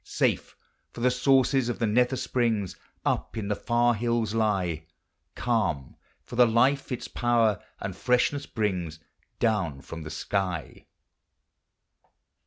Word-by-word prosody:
Safe - - 0 0.2
— - - -46
for 120 - -8
the 125 +1 +4
sources 130 0 +3
of 120 - -2
the 115 - 0
nether 125 +4 +3
springs 115 -7 0 0.3
Up - - -1
in 105 -2 -3
the 105 - +1
far 120 +2 +2
hills 115 -1 0
lie; 95 -8 0 0.5
Calm 105 - -1 0.2
— - - -40
for - - -8
the 125 0 +6
life 130 +5 +2
its 125 - -3
power 115 -4 +2 0.2
and 100 -2 -4
freshness 125 +6 +1
brings 90 -8 -2 0.4
Down 95 - 0
from 80 +4 -8
the 75 - -7
sky. 90 -1 -3
115 Hz, 140 wpm, -27 LUFS, 95-125 Hz, 0.5 s, the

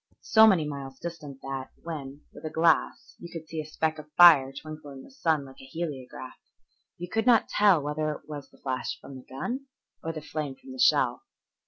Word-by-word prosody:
So 220 0 +7
many 180 -7 +4
miles 135 -2 -6
distant 150 -5 -8
that 135 -1 -5
when, 145 -4 -6
with - - -12
a 155 - -3
glass, 160 +1 +1
you 170 - -10
could 160 -2 -8
see 160 0 -4
a - - -9
speck 155 0 -1
of 150 0 -12
fire 150 -6 +8
twinkle 155 +1 -9
in 135 -1 -10
the - - -15
sun 160 - 0
like 135 0 -14
a - - -11
heliograph, 135 -4 -6 0.6
you 175 - -6
could 225 +6 -1
not 235 -3 +5
tell 195 -8 +4
whether 150 +1 -1
it 150 - -9
was 145 -2 -7
the - - -22
flash 130 -1 -3
from 140 - -11
the 130 - -11
gun 245 - -4 0.4
or 165 - -2
the 160 - -6
flame 150 -3 -4
from 265 - -13
the 260 - -9
shell. 265 - +4
155 Hz, 210 wpm, -28 LUFS, 135-170 Hz, 0.6 s, fire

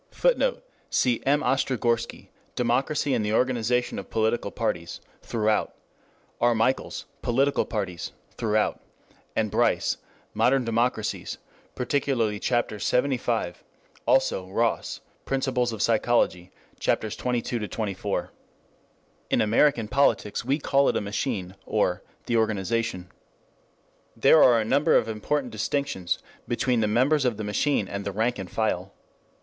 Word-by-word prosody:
[Footnote: - - +1 0.3
Cf. 125 -2 +2
M. 145 +2 +4
Ostrogorski, 120 -3 0 0.3
Democracy 130 +4 +1
and 110 - +1
the 105 +1 -1
Organization 125 0 +1
of - - -9
Political 110 +1 0
Parties, - - -3 0.2
passim; 110 -2 +1 0.7
R. 120 0 +4
Michels, 115 +4 0 0.2
Political 135 +4 +2
Parties, 100 -6 -4 0.2
passim; 110 -1 0 0.6
and 110 -2 0
Bryce, - - +2 0.4
Modern 130 -1 +3
Democracies, 115 +2 -1 0.4
particularly 125 -5 0
Chap. 120 +1 +1
LXXV; 120 -4 0 0.5
also 95 - +2
Ross, 115 +4 -1 0.2
Principles 130 -3 0
of 110 -3 -2
Sociology, 110 -6 +2 0.3
Chaps. 110 -1 0
XXII 125 -1 -1
XXIV. 105 -3 -3 0.5
] - - -38
In - - +2
American 115 +1 +3
politics 125 -4 +1
we 135 +4 +1
call 140 -2 +2
it - - +1
a - - -1
machine, 100 -2 -3
or - - +1 0.2
"the 120 - +1
organization." 110 -3 -1 1.0
3 - - -22
There 160 - +7
are 120 -2 +6
a 110 - -1
number 145 +7 +3
of - - +3
important 125 +4 -2
distinctions 110 -4 -1 0.3
between 120 0 +1
the 110 - +2
members 130 +7 +3
of 120 -5 0
the 110 - -4
machine 105 +1 +1
and 100 0 -4
the 100 - -3
rank 110 +3 0
and 95 -2 -6
file. 100 -4 -2
115 Hz, 130 wpm, -26 LUFS, 105-130 Hz, 1.0 s, There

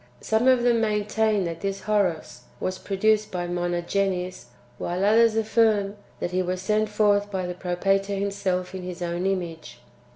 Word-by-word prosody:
Some 220 +3 +1
of 255 -2 +5
them 235 -2 +3
main 210 -2 0
tain 215 -2 +1
that 165 -1 -4
this 195 0 -3
Horos 200 -7 0 0.2
was 185 0 -3
produced 215 +2 +1
by 180 -1 -2
Monogenes, 180 +1 -1 0.3
while 180 +3 -1
others 225 +1 +5
affirm 220 -2 +2 0.2
that 175 - -3
he 185 +1 +1
was 185 0 -2
sent 215 +3 +1
forth 205 -1 +2
by 190 -2 -2
the 180 - -3
Propator 195 +3 0
him 200 +1 -1
self 185 -2 -2
in 190 - -5
His 180 0 -6
own 175 +2 -1
image. 175 -4 -4
195 Hz, 170 wpm, -25 LUFS, 180-210 Hz, 0.3 s, of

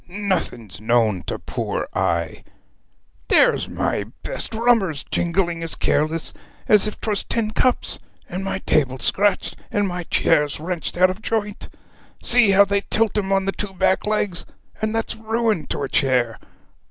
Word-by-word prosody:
'Nothing's 175 - -3
known 110 -4 +2
to - - -2
poor - - -3
I! 85 -3 -1 0.8
There's - - +4
my 100 - -1 0.2
best - - -4
rummers 220 - +2
jingling 170 -1 0
as 165 -1 -2
careless 155 +2 0 0.3
as 210 0 +5
if 215 - -6
'twas 210 -2 -2
tin 220 -2 -1
cups; 250 +3 +1 0.3
and 185 +2 -5
my 195 - -2
table 135 -4 +2
scratched, 200 +9 +1
and 205 -1 0
my 180 -1 -3
chairs 150 -4 +2
wrenched 175 +1 -4
out 185 +1 +5
of 190 +4 -9
joint. 210 -2 -3 0.5
See 240 -3 +6
how 200 +1 +6
they 200 0 0
tilt 220 +1 0
'em 195 -2 -1
on 195 0 +2
the 195 - +1
two 195 -1 -6
back 190 +2 +1
legs 205 -4 0 0.4
and 215 +1 -1
that's 225 - -2
ruin 220 -4 -1
to - - -3
a - - -1
chair! 125 -4 +1
190 Hz, 155 wpm, -22 LUFS, 155-210 Hz, 0.8 s, See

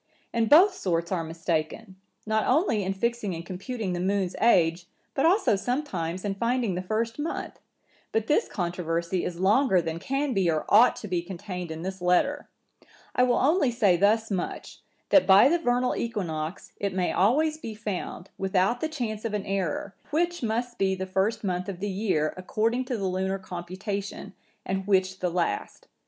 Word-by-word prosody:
And 230 -2 +1
both 370 +6 +7
sorts 170 - -2
are 175 -3 0
mistaken, 165 +4 -3 0.3
not 220 0 +1
only 260 - +2
in 190 - -1
fixing 210 -1 -2
and 165 +1 -7
computing 195 +2 -4
the 175 - -2
moon's 190 0 0
age, 175 -6 +3 0.3
but 275 - +3
also 370 - +3
sometimes 195 - -3
in 200 - 0
finding 235 0 0
the 180 - -2
first 225 +6 -2
month; 310 +3 -4 0.5
but 225 -1 0
this 295 - +2
controversy 170 -1 -2
is 175 -1 -4
longer 200 +2 +4
than 165 -1 -3
can 275 +5 -1
be 190 -5 +2
or 155 -2 0
ought 225 +4 +6
to 210 - -7
be 180 -3 0
contained 180 0 -6
in 160 +1 -6
this 190 0 -5
letter. 180 0 +1 0.6
I - - +2
will 250 -1 +4
only 290 0 +3
say 220 -7 +3
thus 215 +4 +2
much, 185 -3 -4 0.3
that 290 - +5
by 195 +5 +8
the 340 +4 +2
vernal 250 -4 +1
equinox, 175 -7 -4
it 200 -2 -2
may 185 -1 +1
always 305 - +2
be 225 -8 -6
found, 205 -3 -5
without 195 +5 +1
the 315 - -1
chance 230 -8 -4
of 225 -2 -2
an 205 - -3
error, 195 0 -2 0.2
which 345 +3 0
must 240 +1 -2
be 190 -1 +2
the 190 0 -4
first 190 +4 0
month 185 -1 -2
of 185 -3 -6
the 205 +1 -2
year, 185 -6 0
according 225 +7 0
to 250 -2 -2
the 200 - -3
lunar 190 +1 -1
computation, 190 +3 -6 0.3
and 190 0 -2
which 190 -1 +2
the 180 - 0
last. 175 0 -2
195 Hz, 180 wpm, -27 LUFS, 180-235 Hz, 0.6 s, by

